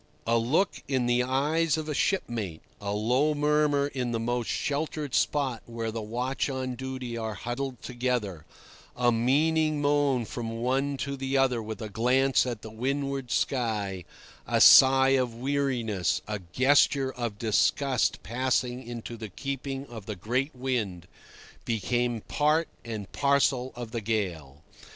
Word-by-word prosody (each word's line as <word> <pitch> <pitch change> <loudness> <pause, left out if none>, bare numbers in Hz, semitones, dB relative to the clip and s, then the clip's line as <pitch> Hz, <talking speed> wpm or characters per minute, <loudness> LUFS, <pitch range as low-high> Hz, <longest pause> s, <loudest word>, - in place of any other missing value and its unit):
A 115 - +2
look 135 - +1
in 130 -3 0
the 120 0 +3
eyes 150 +5 +1
of 155 -1 -4
a 150 - -2
shipmate, 115 - -1 0.2
a 100 0 -3
low 125 +9 +1
murmur 150 -1 +2
in 130 -4 -3
the 115 - 0
most 120 0 -2
sheltered 150 -1 -2
spot 135 -5 +1
where 115 -1 -4
the 115 0 -4
watch 125 +6 -2
on 130 -1 -3
duty 130 -1 -5
are 110 -2 -3
huddled 125 +4 -4
together, 120 -9 -2 0.5
a 120 -1 +3
meaning 150 +6 +2
moan 145 -4 +2
from 115 +1 -5
one 135 +3 0
to 140 +1 -3
the 135 0 -1
other 130 -3 +2
with 110 0 -6
a - - -4
glance 130 +6 +2
at 120 -3 -4
the 110 - -8
windward 135 +2 -2
sky, 105 -10 -1 0.4
a - - +1
sigh 135 0 +8
of 130 -3 +1
weariness, 125 -7 -1
a 105 -1 -3
gesture 135 +1 +3
of 115 -4 -4
disgust 125 +4 +1
passing 125 +1 -1
into 120 -1 -7
the 110 -2 -7
keeping 135 +4 -4
of 115 -6 -10
the 105 - -4
great 130 - -2
wind, 110 -9 -2 0.6
become 120 +1 -1
part 155 +2 +2 0.2
and 110 -4 -6
parcel 140 -2 +2
of 120 -2 -7
the 115 -1 -3
gale. 85 -10 -3
125 Hz, 150 wpm, -28 LUFS, 115-140 Hz, 0.6 s, sigh